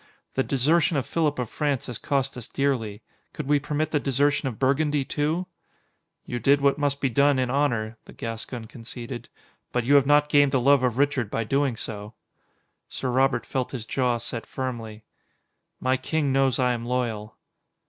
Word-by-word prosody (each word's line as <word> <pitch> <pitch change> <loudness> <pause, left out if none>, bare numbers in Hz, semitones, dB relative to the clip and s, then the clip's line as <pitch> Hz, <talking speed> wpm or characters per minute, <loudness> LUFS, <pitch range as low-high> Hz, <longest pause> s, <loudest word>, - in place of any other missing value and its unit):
The 130 - +1
desertion 150 +5 +2
of 135 - -1
Philip 155 -3 0
of 125 -2 -2
France 145 0 -1
has 120 - -5
cost 135 -1 -1
us 125 -1 -6
dearly. 120 -8 -1 0.3
Could 150 - -5
we 145 0 +4
permit 150 +3 -2
the 150 - +2
desertion 140 +1 +1
of 115 - -8
Burgundy, 140 +1 +1
too?" 155 +6 -1 0.8
"You 120 - -3
did 140 +5 +4
what 140 +1 +2
must 145 -1 0
be 135 - +3
done 140 +2 +3
in 125 -1 0
honor," 120 -6 0
the - - -13
Gascon 115 +1 -5
conceded, 120 +2 -8 0.4
"but 125 - 0
you 135 +5 +2
have 140 -1 +6
not 145 0 +5
gained 145 -1 +4
the 130 - +4
love 140 +2 +5
of 125 -2 0
Richard 140 -5 +1
by 115 - -1
doing 135 +2 +1
so." 105 0 -6 0.7
Sir 130 - -3
Robert 130 -1 +2
felt 130 0 -3
his 120 -4 -4
jaw 125 -1 +1
set 115 0 -4
firmly. 115 -5 -5 0.8
"My 130 +1 +1
king 145 +2 -1
knows 135 -2 +3
I 125 -1 +2
am 115 -1 -4
loyal." 120 -3 -2
130 Hz, 180 wpm, -25 LUFS, 120-145 Hz, 0.8 s, have